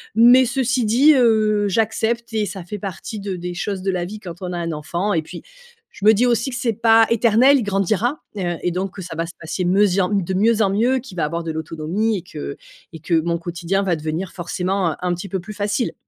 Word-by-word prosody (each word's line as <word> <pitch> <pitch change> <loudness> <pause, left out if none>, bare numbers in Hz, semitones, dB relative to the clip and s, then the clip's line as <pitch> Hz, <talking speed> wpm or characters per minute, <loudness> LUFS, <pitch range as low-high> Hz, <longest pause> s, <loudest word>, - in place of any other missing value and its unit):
Mais 245 +3 +7
ceci 245 -1 0
dit, 265 +8 +5
heu, 215 -4 +3
j'accepte 225 +3 0
et 215 -1 +1
ça 190 -1 -6
fait 210 +5 -6
partie 200 +3 -6
de 195 -2 -4
des 175 0 -6
choses 190 +1 -3
de 195 - -2
la 175 -1 -2
vie, 210 +4 -8
quand 175 -3 -9
on 180 0 -4
a - - -3
un 170 -1 -3
enfant 170 +6 -2
et 165 - +1
puis - - -9 0.5
je 205 - -7
me 220 - +8
dis 240 +4 +2
aussi 240 +1 +1
que 245 - -5
c'est 235 -1 0
pas 225 +1 +5
éternel, 235 +4 +5
il 235 - -2
grandira. 205 - 0 0.2
Heu, 175 -3 -1
et 180 - +1
donc 185 +2 -3
que 190 - -7
ça 165 -1 -7
va 165 0 -2
se 175 - -10
passer 170 +3 -4
me 195 +4 +4
zien 185 -1 +1
de 190 -2 0
mieux 220 +4 +2
en 195 - +1
mieux, 235 +6 +2
qu'il 235 -8 -12
va - - 0
avoir 170 +2 -3
de 165 - -3
l'autonomie 165 +7 -2
et - - -5
que 150 -4 -7 0.4
et 160 - -8
que 165 +1 +1
mon 170 +1 -1
quotidien 175 +3 -2
va 180 -3 +1
devenir 160 +4 -4
forcément, 180 0 -1
heu, - - -5
un 180 -1 0
petit 180 +2 -6
peu 190 - -2
plus 210 +4 -9
facile. 205 +3 -1
195 Hz, 245 wpm, -20 LUFS, 175-225 Hz, 0.5 s, me